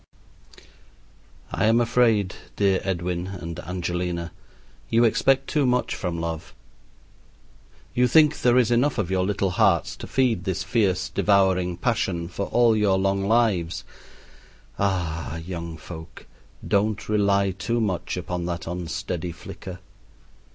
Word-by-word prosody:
I - - 0
am 115 +2 +4
afraid, 115 -5 +2 0.2
dear 100 -2 +2
Edwin 90 -1 -2
and 85 -4 -6
Angelina, 90 -1 -3 0.6
you 115 +1 +4
expect 130 +4 +3
too 145 -4 +1
much 125 0 +1
from 85 -3 -3
love. 80 -1 -5 1.4
You 125 0 +3
think 150 +1 +4
there 120 +1 +4
is 120 -2 +3
enough 125 +4 +2
of 95 -5 -1
your 95 -1 +2
little 95 -1 0
hearts 90 - +2
to - - -8
feed 125 -8 +1
this 95 0 -2
fierce, 95 -6 +1
devouring 95 -3 +2
passion 90 -5 -1
for 100 - -4
all 120 -2 +4
your 105 -3 +3
long 95 0 0
lives. 95 -7 +1 1.0
Ah, 80 -7 -1
young 85 -1 -6
folk! 80 +1 -10 0.4
don't 105 +1 +1
rely 100 -2 +2
too 115 +6 -2
much 100 -6 -2
upon 90 -1 -3
that 85 -1 -4
unsteady 85 0 -4
flicker. 90 +1 -9
95 Hz, 130 wpm, -24 LUFS, 85-110 Hz, 1.4 s, am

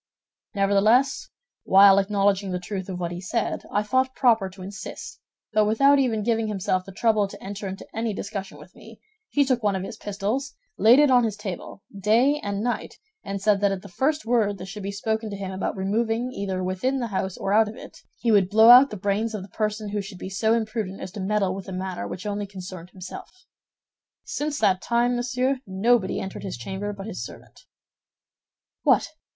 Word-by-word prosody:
Nevertheless, 205 +7 +3 0.3
while 195 0 +7
acknowledging 200 0 +1
the 180 - -1
truth 190 +1 -5
of 180 -1 -4
what 170 -1 -3
he 175 0 -6
said, 215 +4 -2
I 205 - +1
thought 260 +4 +1
proper 225 -6 +3
to 185 0 -12
insist; 200 +2 -8 0.3
but 215 -1 +4
without 275 +7 +4
even 225 -5 +1
giving 225 0 +1
himself 185 -3 -1
the 195 - -9
trouble 215 0 +2
to - - -11
enter 200 +1 -6
into 190 +1 -7
any 225 0 -1
discussion 200 -1 -6
with - - -15
me, - - -14 0.3
he 285 -1 +2
took 255 -2 +1
one 205 -3 +1
of 190 - -3
his - - -7
pistols, 210 +8 -3 0.2
laid 230 +4 +6
it 295 -2 +5
on 250 -1 +5
his 215 -3 -1
table, 200 -1 -7
day 235 +9 +3
and 200 0 -2
night, 240 0 -3 0.3
and 200 0 -4
said 205 0 +2
that 200 -1 +3
at 195 -1 -4
the - - -9
first 275 - -1
word 220 -4 +1
that 185 - -7
should 200 +2 -8
be 200 +1 -4
spoken 220 +2 -2
to 205 - -5
him 195 -1 -5
about 190 +1 -3
removing, 225 +5 -1
either 190 -5 -3
within 190 +9 -1
the 240 -3 -3
house 190 -1 -2
or 195 - -1
out 220 +1 +5
of 215 - -9
it, - - -12 0.2
he 230 - 0
would 195 -3 +4
blow 220 +3 +8
out 255 +3 +9
the 210 - -6
brains 205 +3 -1
of 200 - -5
the 195 - -12
person 215 +1 -2
who 205 0 -2
should 195 -1 -9
be 185 - -7
so 220 +4 +2
imprudent 220 -4 -3
as 185 - -7
to 205 - -8
meddle 195 -1 0
with 190 -1 -7
a - - -6
matter 185 0 -4
which 185 - -7
only 205 0 -3
concerned 185 -2 -9
himself. 185 -1 -9 0.9
Since 295 0 -3
that 185 -1 +3
time, 240 +1 +1
monsieur, 250 +2 0
nobody 195 +2 +1
entered 190 - -6
his 190 - -5
chamber 190 +11 -4
but 200 -1 -8
his 215 - -5
servant." - - -13 1.1
"What! - - +3
205 Hz, 205 wpm, -24 LUFS, 195-230 Hz, 1.1 s, out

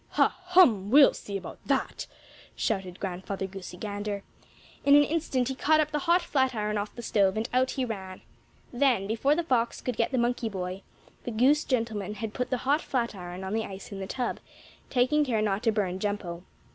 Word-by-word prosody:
"Ha! - - +4
Hum! 285 - +5
We'll 280 +4 +7
see 200 -1 -5
about - - -9
that!" - - -1 0.5
shouted 190 -4 -2
Grandfather 190 +1 -4
Goosey 190 -2 -8
Gander. 205 0 -4 0.6
In 280 0 +6
an 290 - +7
instant 290 -5 0
he 265 - -1
caught 310 +4 +3
up 305 0 +1
the 300 - 0
hot 345 +1 +5
flatiron 240 -8 0
off 205 +1 -5
the 240 - -7
stove, 200 -2 +2
and 220 +2 -1
out 255 +1 +3
he 260 -1 -1
ran. 190 -5 -6 0.5
Then, 245 -6 +2
before 230 +8 +2
the 345 - 0
fox 240 -6 0
could 250 - -3
get 230 - +3
at - - -12
the - - +2
monkey 240 -1 0
boy 185 -1 -5 0.4
the - - -4
goose 260 +7 +3
gentleman 220 -5 -2
had 215 0 -5
put 250 0 -2
the 255 - 0
hot 290 +4 +3
flatiron 190 -8 -3
on 190 +2 -4
the 220 0 0
ice 195 +2 -9
in 200 - -6
the 190 - -5
tub, 245 +3 -3 0.5
taking 265 +4 +3
care 240 -6 0
not 205 -1 0
to 230 -2 +2
burn 190 -4 -1
Jumpo. 190 -4 -3
225 Hz, 200 wpm, -28 LUFS, 195-260 Hz, 0.6 s, We'll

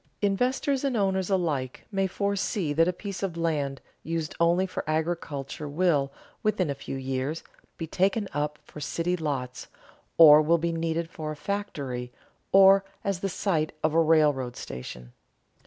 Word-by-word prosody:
Investors 255 +7 +1
and 270 -4 0
owners 190 -2 +1
alike 155 -9 -1
may 195 -1 +1
foresee 200 -3 -1
that 165 +3 +4
a - - +3
piece 195 +1 -7
of 185 -4 -3
land 145 -5 -1 0.2
used 165 -1 -3
only 170 +3 +3
for 185 - -4
agriculture 155 -3 -3
will, 145 -3 +1 0.3
within 195 -7 +1
a - - 0
few 135 - -7
years, 135 +4 -3 0.3
be 165 - -4
taken 195 +5 0
up 150 +1 -2
for - - -11
city 170 +5 -1
lots, 135 -7 -4 0.5
or 155 -2 +9
will 165 +3 +3
be 170 +1 -1
needed 165 0 -1
for 155 -2 -6
a - - -5
factory 145 -10 -4 0.4
or 195 0 +7 0.2
as 195 -3 -1
the 195 - -2
site 165 -5 -1
of 155 0 +2
a 165 - +5
railroad 150 -6 +3
station. 60 -1 -8
165 Hz, 155 wpm, -27 LUFS, 145-190 Hz, 0.5 s, or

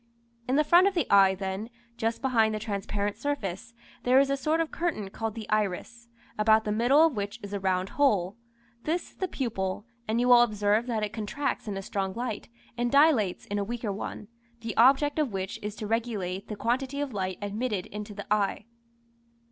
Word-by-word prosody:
In 255 - +1
the 300 - +4
front 345 +5 +6
of 395 - 0
the 340 -7 +2
eye 195 -1 +6
then, 190 +3 -4 0.3
just 230 +2 -2
behind 225 -4 +3
the - - -3
transparent 205 -1 -3
surface, 235 -5 -4 0.3
there 255 +2 +5
is 275 0 +3
a - - +2
sort 305 +4 0
of 325 -1 -1
curtain 310 - -2
called 225 +1 -4
the 220 -2 -7
iris, 215 +3 -1 0.3
about 220 +1 +5
the 210 - -2
middle 250 +9 +5
of 325 - +1
which 205 +2 -4
is 200 0 -7
a 200 - -1
round 190 0 0
hole. 205 -10 +2 0.5
This 335 +3 -2
is - - -29
the 375 - -1
pupil, 205 - -3 0.2
and 220 +2 +1
you 245 +1 +2
will 245 -1 +8
observe 210 0 +2
that 225 -3 -1
it 210 +1 -3
contracts 240 +4 -3
in 200 -2 -3
a 195 - -5
strong 195 -1 -2
light, 235 -3 -4 0.3
and 240 0 -1
dilates 280 - +4
in 205 0 -2
a - - 0
weaker 225 0 -3
one, 205 +1 -6 0.3
the 225 -1 -4
object 275 +5 +4
of 280 -8 0
which 190 0 -4
is 210 0 -5
to 215 - -6
regulate 205 -4 -2
the 210 - -5
quantity 260 +6 -1
of 285 -4 -3
light 185 -2 -2
admitted 205 -1 -2
into 210 0 -7
the 205 - -7
eye. 205 0 0
220 Hz, 205 wpm, -28 LUFS, 200-255 Hz, 0.5 s, will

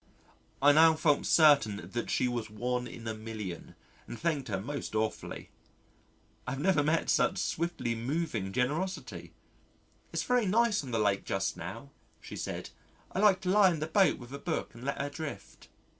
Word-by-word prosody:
I 145 - +8
now 160 +2 +6
felt 155 -2 +2
certain 140 -10 +4
that 120 - -3
she 125 - +1
was 120 -3 -3
one 125 +3 -2
in 115 -1 -9
a 110 - -2
million 110 -5 -7 0.3
and 120 - -7
thanked 155 -5 -1
her 100 -4 -2
most 140 +2 -5
awfully. 110 0 -3 1.0
I - - -2
have 135 - -5
never 175 0 +3
met 155 +3 +1
such - - +2
swiftly 170 -8 -1
moving 115 - -2
generosity. 125 - -2 0.8
"It's 165 0 -1
very 245 -4 +2
nice 220 -1 +2
on 135 - -8
the 115 - -1
Lake 100 -2 +1
just 95 0 -1
now," 95 +11 -8 0.3
she - - -9
said. - - -5 0.4
"I - - -3
like 195 -2 +4
to 180 - -2
lie 200 -2 +6
in 165 - -3
the 155 - -1
boat 185 +4 +3
with 120 +1 -11
a 140 - -5
book 160 +1 -3
and 120 +1 -12
let 140 - -2
her 140 +1 -2
drift." 155 0 -8
140 Hz, 180 wpm, -30 LUFS, 115-165 Hz, 1.0 s, I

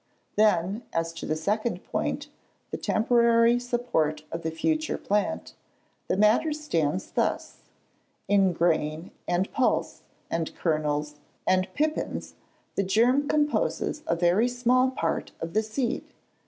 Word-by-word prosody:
Then, 205 0 +2
as 165 0 -1
to 165 - -7
the 155 - 0
second 210 +8 -1
point, - - -2 0.4
the - - -2
temporary 235 +1 +3
support 240 -12 -1
of 165 - -4
the 160 - -2
future 310 - -1
plant, 210 +10 -1 0.5
the - - 0
matter 215 +9 +4
stands 185 - -1
thus. - - -1 0.7
In 195 -2 +4
grain, 165 -1 0 0.2
and 180 +2 0
pulse, 260 -3 0 0.3
and 165 -1 -3
kernels, 150 -2 -1 0.3
and 185 0 +2
pipins, 310 +1 -2 0.4
the - - +1
germ 240 +9 +3
composes 300 +3 0
a 170 - +2
very 175 +7 +3
small 250 +1 +2
part 165 -11 -2
of 165 0 -5
the 215 - +3
seed. 235 +3 -2
205 Hz, 125 wpm, -27 LUFS, 165-245 Hz, 0.7 s, matter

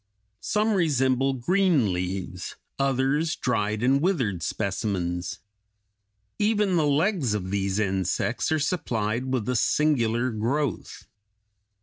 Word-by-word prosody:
Some 215 +1 +1
resemble 135 -6 +2
green 150 - +2
leaves; 90 0 -4 0.2
others 135 +4 +1
dried 105 -3 -1
and 135 +2 +3
withered 130 - 0
specimens. 95 -3 -2 1.0
Even 210 -3 +2
the 155 -3 +2
legs 145 - +1
of 95 -2 -4
these 100 -1 -1
insects 95 - 0
are 155 - +3
supplied 125 - -1
with 125 -5 -1
a 125 - 0
singular 125 -3 +2
growth. 120 - -2
125 Hz, 105 wpm, -25 LUFS, 105-150 Hz, 1.0 s, and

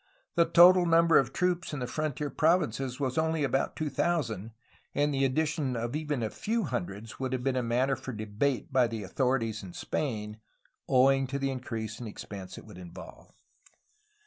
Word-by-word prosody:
The 170 - +4
total 175 +2 +7
number 165 -1 +6
of 130 -2 -1
troops 180 +1 0
then - - -4
in 135 - -5
the - - -1
frontier 150 -2 -2
provinces 155 -6 +1
was 130 0 0
only 160 -1 +1
about 135 0 0
two 155 -2 -3
thousand, 125 - -1 0.5
and 145 0 +2
the 135 0 +1
addition 145 -1 0
of 120 +3 -3
even 150 -5 -2
a 110 - -2
few 225 +1 -1
hundreds 110 - -5
would 130 -1 -2
have 125 -1 -2
been 130 -2 0
matter 130 +3 +2
for 130 - -7
debate 110 +6 -2
by 130 -2 +4
the 115 -2 -5
authorities 115 +1 0
in 95 -3 -10
Spain, 105 -6 -3 0.5
owing 135 +1 +4
to 140 +2 -3
the 135 0 -1
increase 115 -4 -5
in 120 - -6
expense 100 -3 -8
it - - -11
would 105 -4 -12
involve. 90 -2 -11
130 Hz, 180 wpm, -29 LUFS, 115-150 Hz, 0.5 s, total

